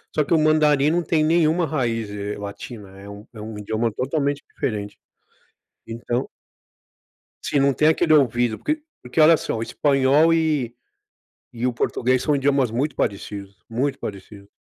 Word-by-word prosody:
só 150 - +3
que 140 - -1
o 165 - +4
mandarim 150 -2 +3
não 175 +1 +1
tem 160 -2 +1
nenhuma 165 +1 +2
raiz, 115 -8 -2
eh, 105 0 -5
latina, 100 -1 -9
é 100 - -11
um 100 +2 -11
é 110 - -9
um 110 0 -7
idioma 110 +2 -1
totalmente 140 +4 -1
diferente. 105 -4 -4 0.9
Então 120 +2 -3 1.2
Sim, 145 - 0
não 140 0 +3
tem 150 - +2
aquele 160 0 +3
ouvido, 120 -5 +2
porque 305 +1 -2 0.2
porque 125 +5 -4
olha 160 +1 +7
só, - - -3
o 110 - -2
espanhol 140 +5 +3
e 150 -7 0 0.8
e 120 +1 -2
o 125 - 0
português 125 +1 0
são 150 -2 +1
idiomas 140 -3 +1
muito 135 +6 -1
parecidos, 100 -2 -4
muito 130 +5 -1
parecidos. 100 0 -9
130 Hz, 160 wpm, -22 LUFS, 110-155 Hz, 1.2 s, olha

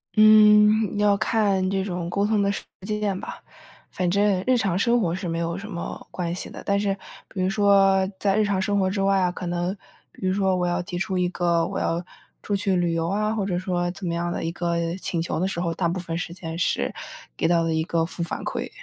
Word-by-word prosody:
嗯， 215 -1 +6
要 205 -1 +3
看 200 -4 +1
这 195 0 0
种 175 -3 -4
沟 200 +2 0
通 210 -1 +2
的 200 0 +2
实 - - -4 0.2
践 210 -2 -1
吧。 215 - -8 0.5
反 180 -1 -1
正 200 -1 +2
日 255 - +4
常 195 -5 0
生 235 +3 +3
活 170 -4 0
是 185 -1 -5
没 165 0 -2
有 170 +2 -2
什 200 +2 -8
么 170 -4 -6
关 175 -2 -3
系 180 - -5
的， - - -9
但 200 0 +2
是 200 -1 +1 0.3
比 195 - -5
如 185 - +1
说 195 -1 +4
在 195 -1 +2
日 215 - +4
常 195 -2 0
生 200 +1 +1
活 190 -1 +2
之 195 0 -2
外 195 0 +3
啊， 180 -1 +2
可 180 - -6
能 175 +2 -1 0.4
比 185 - -5
如 185 - +2
说 190 -2 +1
我 180 -1 0
要 175 +1 0
提 175 0 -5
出 190 -2 -1
一 180 0 +2
个 170 -2 +1
我 - - -3
要 170 +1 -1 0.4
出 205 - -1
去 195 -1 +1
旅 175 -2 +1
游 165 0 -1
啊， 215 +2 0
或 205 -3 -1
者 180 -3 -1
说 175 -1 -1
怎 190 +1 -8
么 170 - -1
样 175 0 -2
的 - - -3
一 165 - -1
个 170 0 -1
请 170 - -2
求 165 - -2
的 185 - +1
时 190 -3 -3
候， 170 -1 -1
大 170 0 0
部 180 +2 -2
分 165 -2 -4
时 170 -1 -4
间 165 -2 -6
是 170 - 0 0.4
给 - - 0
到 170 0 +3
的 165 -1 0
一 160 0 +1
个 165 0 0
负 170 - -6
反 170 - -5
馈。 - - -3
185 Hz, 270 characters per minute, -24 LUFS, 175-200 Hz, 0.5 s, 嗯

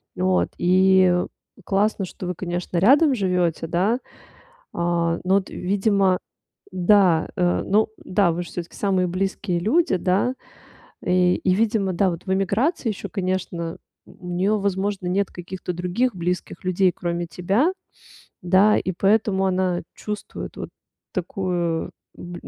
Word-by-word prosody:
Вот, 185 0 +1
и, 185 +1 +4
э, 180 - 0 0.4
классно, 200 0 +1
что 185 - -8
вы, 180 - -3
конечно, 175 0 -4
рядом 275 - +5
живёте, 180 -6 0
да, 190 +9 +1 0.7
а, 170 -1 0
но 190 +2 +3
т - - -13
видимо, 195 -1 +1 0.5
да, 185 -2 +3
э, 175 -1 +1
ну 210 +3 +2 0.2
да, 185 -2 +2
вы 175 +2 -3
ж - - -11
всё-таки 170 0 -7
самые 190 -3 +1
близкие 185 0 -2
люди, 225 - +2
да. 195 +8 +1 0.7
И 180 0 +3
и 185 - +1
видимо, 205 -3 +1
да, 190 +2 +2
вот 170 - -7
в 190 - 0
эмиграции 220 - 0
ещё, 210 - -5
конечно, 185 -3 -3 0.3
у 185 -2 -13
неё, 190 +4 +1
возможно, 195 -1 -1
нет 195 +2 0
каких-то 180 +1 -6
других 180 +7 -1
близких 180 0 -3
людей, 185 0 +3
кроме 175 0 -3
тебя, 195 - +1 0.7
да. 190 +4 +4
И 185 - -1
поэтому 195 0 +2
она 185 -1 0
чувствует 210 -1 -6
вот - - -6 0.4
такую, 175 -2 -2 0.3
м, 175 0 -9
185 Hz, 140 wpm, -23 LUFS, 175-200 Hz, 0.7 s, рядом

